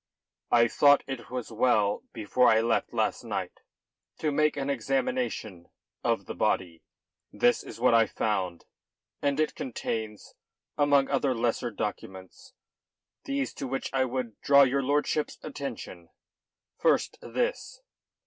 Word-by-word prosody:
"I 120 0 +5
thought 145 +4 +5
it 135 -3 -7
as 125 -2 -5
well 110 -3 +2
before 120 +3 +2
I 110 -1 +5
left 115 +1 0
last - - -1
night - - -4 0.6
to 155 - -1
make 150 +1 +2
an 135 -1 -2
examination 245 - -2 0.3
of - - 0
the - - -6
body. 85 -3 -1 0.5
This 120 - +2
is - - -10
what 120 0 +4
I 115 -1 +5
found, 95 -7 -2 0.6
and 140 0 0
it 155 - +1
contains, 110 -4 -5 0.4
among 145 -2 +3
other 135 -2 +1
lesser 120 +1 0
documents, 95 -4 -7 0.7
these 275 0 -2
to 135 - -5
which 135 +1 -4
I 130 -1 +2
would 125 -3 -4
draw 140 0 +6
your 135 +1 +2
lordship's 145 +2 0
attention. 130 - -7 0.7
First 455 - +1
this." - - -3
130 Hz, 130 wpm, -28 LUFS, 110-145 Hz, 0.7 s, draw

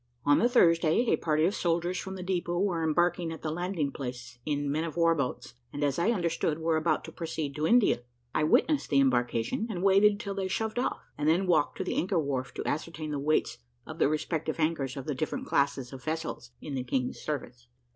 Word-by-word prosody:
On 145 0 +5
the 240 - +3
Thursday, 170 -2 +4
a - - +5
party 155 -1 +1
of 190 - +1
soldiers 175 0 0
from 190 0 -6
the 185 - -6
depot 175 -2 -1
were 180 -4 0
embarking 175 +1 +1
at 160 - -8
the 155 - -1
landing 175 -3 -2
place 125 -2 -7
in 145 -1 0
men 155 +3 0
of 165 0 -5
war 165 -1 +4
boats, 135 -5 -3 0.2
and, 145 - -3
as 140 0 +1
I 175 - +2
understood, 170 -7 0
were 165 0 0
about 155 0 +1
to 160 - -8
proceed 160 -4 -4
to 155 +1 0
India. 235 - +4 0.3
I 155 - +2
witnessed 295 - +2
the 140 - +4
embarkation, 120 - +1
and 185 -4 -3
waited 200 +1 +5
till 200 -1 -4
they 195 -1 -2
shoved 220 +4 -2
off, 250 - -2
and 150 +1 +2
then 175 +4 +3
walked 170 -5 +2
to - - -2
the - - -3
anchor 185 +1 +1
wharf 135 -5 -1
to - - -4
ascertain 155 0 -3
the 145 - -2
weights 155 +2 0 0.3
of - - -9
the - - +4
respective 155 +1 -2
anchors 150 -5 0
of 135 - -5
the 150 - -1
different 155 - -3
classes 140 - 0
of 130 -1 -9
vessels 155 -5 -4
in 145 - -7
the 130 -2 -2
King's 125 0 -2
service. 125 -5 -5
160 Hz, 220 wpm, -29 LUFS, 140-175 Hz, 0.3 s, On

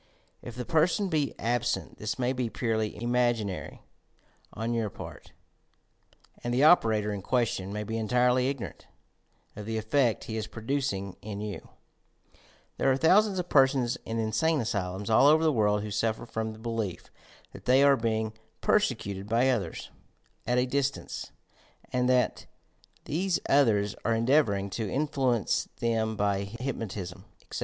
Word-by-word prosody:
If 120 - -9
the 125 0 -5
per 160 0 +4
son 200 +1 -1
be 150 -4 0
absent, 120 +1 -1
this 110 0 -3
may 125 0 0
be 125 -3 -2
purely 110 -2 -1
imaginary 120 -4 -1 0.7
on 115 +2 -3
your 115 -2 0
part, - - -10 1.1
and 120 - -2
the 125 +4 +2
operator 110 -10 +4
in 100 - -4
question 110 -4 0
may 105 +1 -3
be 110 +2 -3
entirely 125 +4 +2
ignor 140 -3 -5
ant - - -21 0.7
of 105 0 -8
the 110 0 -2
effect 115 +2 +1
he 110 - -5
is 110 -1 -3
producing 110 -4 -3
in 105 -1 -6
you! 105 -1 -6 1.1
There 135 - +3
are 130 - +2
thousands 195 +6 +4
of 180 -1 -3
persons 130 -3 +3
in 115 - -4
insane 115 +9 +1
asylums 100 -2 -2
all 125 +5 +6
over 155 +2 +5
the 155 -2 +3
world 105 -3 +2
who 105 - -5
suffer 110 +3 -1
from 110 -1 -3
the - - -12
belief 110 -6 -4 0.4
that - - -12
they 130 +2 +5
are 140 -1 +6
being 110 -2 -1 0.3
"persecuted" 100 0 0
by 120 +4 +3
others 125 - -3 0.6
at 125 +1 +2
a 125 - +3
distance, 140 +1 -2 0.6
and 125 0 +2
that 125 -1 +1 0.6
these 175 +5 0
others 105 -8 +3
are 115 +1 +2
endeavouring 115 -5 +2
to 110 -1 -3
influence 135 -6 0
them 110 -1 0
by 100 -1 0
hyp 120 +7 -4
notism, 95 -5 -6 0.2
etc. - - -6
115 Hz, 155 wpm, -28 LUFS, 105-130 Hz, 1.1 s, all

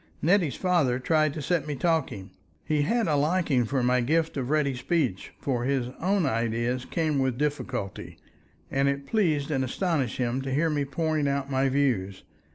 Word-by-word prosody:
Nettie's 170 -3 +2
father 170 -10 +2
tried 155 +3 +2
to 150 - -4
set 160 0 0
me 150 - -2
talking; 140 - -1 0.3
he 150 -1 +1
had 230 +9 +1
a 150 - +2
liking 150 -4 +2
for 130 +2 -1
my 125 +1 +3
gift 160 +6 +1
of 130 -3 -3
ready 150 -2 +2
speech, 125 - -1
for 125 -4 -1
his 130 -2 0
own 190 0 +2
ideas 120 +1 -1
came 155 -4 0
with 130 -2 0
difficulty, 135 -8 -3 0.5
and 135 +1 +2
it 140 0 -3
pleased 155 -8 +1
and 135 -2 +1
astonished 140 - -1
him 125 +1 -1
to 135 0 -4
hear 155 +4 +1
me 145 -2 0
pouring 155 +1 -1
out 140 0 -1
my 135 0 +2
views. 120 -9 0
140 Hz, 175 wpm, -27 LUFS, 130-155 Hz, 0.5 s, my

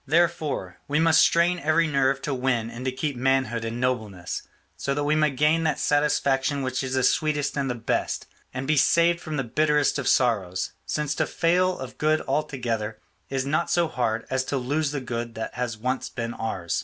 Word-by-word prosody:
Therefore, 155 - 0
we 150 +2 +1
must 165 0 +5
strain 170 +1 +3
every 160 +2 +2
nerve 140 -2 +1
to 145 - -1
win 125 -3 0
and 120 +2 -7
to 130 - +1
keep 135 +2 -3
manhood 130 -2 +1
and 115 +1 -4
nobleness; 110 -8 -2 0.3
so 140 +11 -2
that 145 - -1
we 145 +1 +2
may 155 -1 +3
gain 150 +4 +2
that 155 -3 +1
satisfaction 145 -2 +1
which 130 0 -1
is 130 -1 -2
the 130 - +1
sweetest 150 -1 +1
and 140 -2 -1
the 125 - -1
best, 115 -1 -2 0.3
and 130 +1 -4
be 155 0 +2
saved 170 +5 +4
from 155 -3 -5
the 135 - 0
bitterest 150 +4 +2
of 130 - -3
sorrows; 95 -8 +1 0.2
since 150 -1 -1
to - - 0
fail 180 +2 +2
of 130 -1 -8
good 155 +1 +3
altogether 125 -7 -2 0.3
is 135 -1 -1
not 155 +4 0
so 175 -1 +2
hard 115 -6 -1
as 130 0 +1
to 140 - -1
lose 145 +4 0
the 145 -1 -3
good 120 -2 -4
that 110 - -5
has 120 -2 -3
once 125 +4 -2
been 115 -1 -4
ours. 95 -6 -2
135 Hz, 200 wpm, -25 LUFS, 120-150 Hz, 0.3 s, must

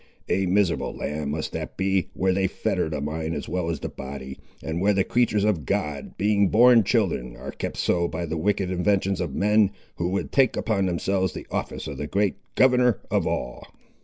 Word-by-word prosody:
A 95 -1 +1
miserable 95 -1 +1
land 75 -1 -3
must 80 +2 -3
that - - -6
be, 95 -1 +1
where 95 0 +2
they 95 0 +1
fetter 80 - -1
the 75 - -3
mind 80 +3 -3
as - - -5
well 90 -2 -2
as 80 -5 -3
the - - -3
body, 65 0 -8 0.2
and 80 +2 -3
where 105 +2 +4
the 95 - +3
creatures 115 -3 +1
of 105 -8 +1
God, 70 +2 -3
being 100 0 +3
born 120 +1 +6
children, 95 - 0
are - - -7
kept - - -5
so 85 -1 +1
by 85 +2 -4
the 80 0 -3
wicked 95 +2 0
inventions 95 0 +1
of 85 -6 -3
men 105 0 +4 0.3
who 85 - -1
would 95 +2 -2
take 135 -3 +3
upon 100 -4 0
themselves 95 0 0
the - - -7
office - - -3
of - - -6
the 75 - -3
great 100 +3 0 0.2
Governor 125 -4 +4
of - - +1
all!" - - -3
95 Hz, 200 wpm, -25 LUFS, 80-105 Hz, 0.3 s, born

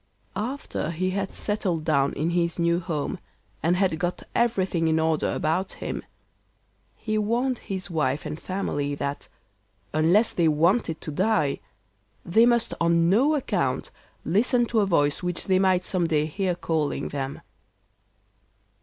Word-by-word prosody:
After 250 - -3
he 185 +3 -1
had 195 0 -3
settled 185 -7 -1
down 140 -3 +2
in 160 +3 -1
his 170 -1 0
new 170 0 +2
home, 165 -5 -3 0.4
and 170 +2 +2
had 180 -4 +1
got 175 +1 -2
everything 190 -8 +1
in 160 0 +2
order 160 -1 +1
about 170 +5 -1
him, - - -5 0.9
he 215 -1 -2
warned 240 +4 0
his 190 -2 -5
wife 150 -3 0
and 150 +1 -5
family 145 -7 -2
that, 140 0 -4 0.7
unless 175 +9 +3
they 170 -2 +2
wanted 165 +3 +2
to 155 - -5
die, 185 -3 +1 0.7
they 225 +7 +5
must 235 -1 +2
on 170 0 +3
no 270 +10 +4
account 285 - -1 0.3
listen 240 +6 +2
to 230 -1 +1
a 205 - +2
voice 145 -5 +2
which 180 -1 -2
they 185 -1 +3
might 185 -1 +2
some 180 -3 +1
day 155 -2 +1
hear 180 +3 -1
calling 160 -4 -1
them. 140 -1 -4
175 Hz, 145 wpm, -25 LUFS, 160-200 Hz, 0.9 s, they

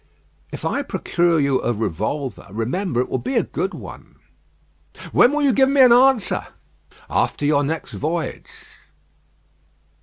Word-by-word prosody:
"If - - -7
I - - 0
procure 170 -1 0
you 140 -2 +1
a 120 - 0
revolver, 115 - -4
remember, 120 - -2
it - - -3
will 130 - -2
be 130 +3 -4
a - - +3
good 190 +2 -4
one." - - -11 1.0
"When 245 - +5
will 295 0 0
you 275 -3 +3
give 265 +1 +4
me 275 0 +4
an 250 -2 +7
answer?" 250 -4 +3 0.6
"After 145 - -1
your 145 -1 +2
next 160 +3 -4
voyage." 165 +2 -3
160 Hz, 145 wpm, -21 LUFS, -, 1.0 s, an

